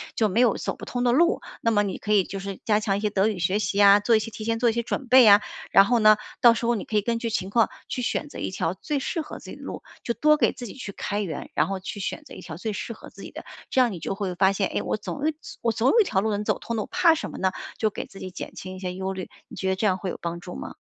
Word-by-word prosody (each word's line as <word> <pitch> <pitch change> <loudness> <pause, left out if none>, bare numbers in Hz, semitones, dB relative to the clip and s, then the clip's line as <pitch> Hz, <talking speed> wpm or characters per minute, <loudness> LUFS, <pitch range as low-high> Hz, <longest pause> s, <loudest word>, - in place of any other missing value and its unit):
就 215 -2 +2
没 205 - 0
有 245 -3 +4
走 - - -4
不 - - -8
通 245 0 -2
的 240 - +3
路， 340 +7 +3 0.2
那 230 - +2
么 205 -2 +3
你 195 -2 -3
可 210 - -1
以 200 -3 +5
就 195 - -6
是 195 -1 -6
加 210 -1 +2
强 200 -2 0
一 - - -4
些 210 - +1
德 200 0 +2
语 215 -4 -1
学 185 +4 +1
习 200 -1 -2
呀， 205 0 +7
做 225 +3 +3
一 - - +4
些 225 +1 -5
提 215 0 -7
前 225 0 0
做 240 0 +4
一 225 - 0
些 235 - 0
准 250 +2 -4
备 255 0 +8
呀。 205 -1 +8 0.3
然 195 - +8
后 240 0 +2
呢， 215 0 +7 0.3
到 235 -1 +8
时 235 - -3
候 240 +1 +2
你 205 - -4
可 215 - -5
以 - - +3
根 230 +2 -1
据 230 -1 -2
情 190 -3 -2
况 230 +1 +3 0.2
去 250 - -2
选 285 +4 -2
择 - - -9
一 - - -2
条 180 -2 -1
最 290 +9 -3
适 330 - -3
合 310 - -8
自 - - -12
己 - - -9
的 - - -14
路， - - -7 0.2
就 235 - -1
多 305 +4 +4
给 - - +2
自 245 - -8
己 - - -9
去 255 -7 -7
开 205 - -3
源， 165 -7 -5
然 - - +2
后 195 -1 -4
去 205 - -6
选 300 +10 -4
择 - - -13
一 - - -9
条 160 - -8
最 215 +5 -3
适 230 +3 -5
合 - - -13
自 - - -13
己 - - -9
的， - - -9 0.3
这 260 - +3
样 240 -3 +3
你 175 - -6
就 195 - -3
会 195 -3 -3
发 190 +1 +4
现， 195 -1 0
诶？ - - -2
我 - - -1
总 210 - -6 0.4
我 230 -1 +1
总 230 +5 +2
有 465 - +4
一 420 - +5
条 190 - +1
路 220 +1 0
能 205 +1 -2
走 - - 0
通 230 - -4
的， 215 - 0
我 - - -10
怕 360 -2 +4
什 - - -4
么 - - -8
呢？ 190 0 +1 0.3
就 215 - +1
给 - - -6
自 195 - -13
己 185 - -7
减 - - -8
轻 185 0 -7
一 185 - -9
些 180 -1 -4
忧 190 +1 -3
虑， 190 -1 -6 0.2
你 - - -11
觉 190 - -2
得 190 - +1
这 200 +3 -1
样 185 -2 +3
会 190 - -4
有 - - -5
帮 170 0 -4
助 175 - -9
吗？ 65 - -7
210 Hz, 360 characters per minute, -25 LUFS, 195-235 Hz, 0.4 s, 备